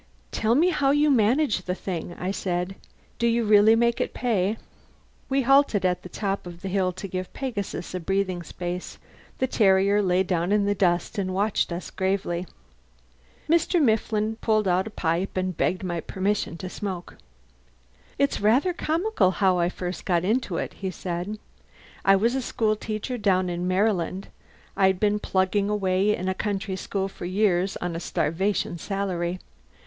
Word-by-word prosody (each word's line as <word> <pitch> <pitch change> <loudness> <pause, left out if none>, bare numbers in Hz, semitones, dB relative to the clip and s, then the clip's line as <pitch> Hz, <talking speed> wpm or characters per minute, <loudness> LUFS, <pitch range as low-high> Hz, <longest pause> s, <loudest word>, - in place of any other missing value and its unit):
"Tell 225 +1 +1
me 335 +6 +4
how 280 -6 +1
you 290 +1 +4
manage 245 -1 +3
the 180 - -1
thing," 175 -2 -5
I 185 +2 -2
said. 180 -1 -2 0.4
"Do 235 - +2
you 235 0 +2
really 215 +1 +6
make 235 0 +2
it - - -3
pay?" 215 -3 0 0.7
We 270 0 +2
halted 270 -6 +4
at 180 -1 +1
the 180 - -10
top 195 -2 -3
of 175 0 -10
the 195 - -3
hill 185 -1 +1
to 190 +2 -6
give 185 0 -5
Pegasus 205 -10 -4
a 185 - -2
breathing 190 0 -1
space. 175 +2 -6 0.4
The 260 - +1
terrier 200 -3 +3
lay 185 -1 +2
down 180 -1 -1
in 205 -1 +3
the 205 - +2
dust 180 +2 0
and 185 -1 -2
watched 200 -1 +1
us 170 +2 -5
gravely. 190 -2 -1 1.0
Mr. 340 +2 +3
Mifflin 220 -4 +1
pulled 215 -3 +1
out 185 +2 +2
a - - -5
pipe 180 -1 -2
and 185 -1 -1
begged 185 +4 0
my 175 -2 -2
permission 195 -2 -2
to 185 - -6
smoke. 185 -2 -6 1.0
"It's 280 -4 +1
rather 250 - +3
comical 340 - +1
how 185 -1 +2
I 170 0 +2
first 180 -2 -5
got 175 -2 +1
into 215 -4 0
it," - - -3
he 190 - -4
said. 180 +3 -4 0.7
"I 195 - +6
was 230 +5 +2
a 265 - 0
school 220 -3 0
teacher 215 +4 -4
down 185 -3 +2
in 175 +1 -2
Maryland. 190 -1 0 0.5
I'd 190 -1 +3
been 210 0 +2
plugging 195 +1 +1
away 200 0 +2
in 185 - -4
a 190 - +1
country 200 -1 -2
school 195 +1 -2
for 190 - -9
years, 190 0 +1
on 175 -1 -4
a - - -2
starvation 175 +1 -1
salary. 185 -2 -2
195 Hz, 170 wpm, -25 LUFS, 180-215 Hz, 1.0 s, really